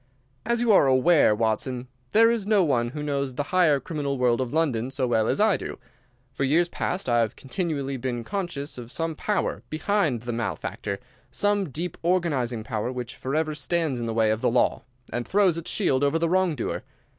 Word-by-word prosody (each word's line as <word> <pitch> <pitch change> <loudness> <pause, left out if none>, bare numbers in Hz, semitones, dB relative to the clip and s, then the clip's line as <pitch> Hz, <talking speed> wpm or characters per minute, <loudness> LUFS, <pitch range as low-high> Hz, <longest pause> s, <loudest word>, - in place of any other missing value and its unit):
"As 235 0 +1
you 240 -2 +3
are 190 -8 +6
aware, 130 -2 +5
Watson, 120 +3 -1 0.2
there 230 - +5
is 225 -4 -2
no 210 -3 +4
one 120 -7 +1
who 150 +4 -6
knows 140 -3 -2
the 145 - -1
higher 170 -6 +4
criminal 140 -2 -3
world 125 0 +2
of 125 -2 -3
London 135 -7 0
so 135 -1 -1
well 110 -3 +2
as - - 0
I 215 -1 +4
do. - - -6 0.6
For 135 - -2
years 160 +6 +3
past 180 0 -3
I 120 -1 +3
have 115 -2 0
continually 140 -3 -3
been 120 -1 -3
conscious 170 - -4
of 120 0 -9
some 165 0 -2
power 205 +6 -1
behind 155 - 0
the 120 0 -3
malefactor, 105 -3 -3 0.3
some 205 +7 +1
deep 165 +6 -5
organizing 145 -10 0
power 110 +2 -3
which 125 -2 -6
forever 155 +4 -1
stands 150 -2 -1
in 115 - -3
the 115 - -2
way 110 -1 +3
of 110 +1 -1
the - - +3
law, 120 +1 +2 0.3
and 120 -1 -2
throws 195 -4 +3
its 170 -1 -5
shield 140 -10 +1
over 145 +3 +2
the 165 0 0
wrong 185 -2 +2
doer. 120 - -3
140 Hz, 200 wpm, -25 LUFS, 120-175 Hz, 0.6 s, are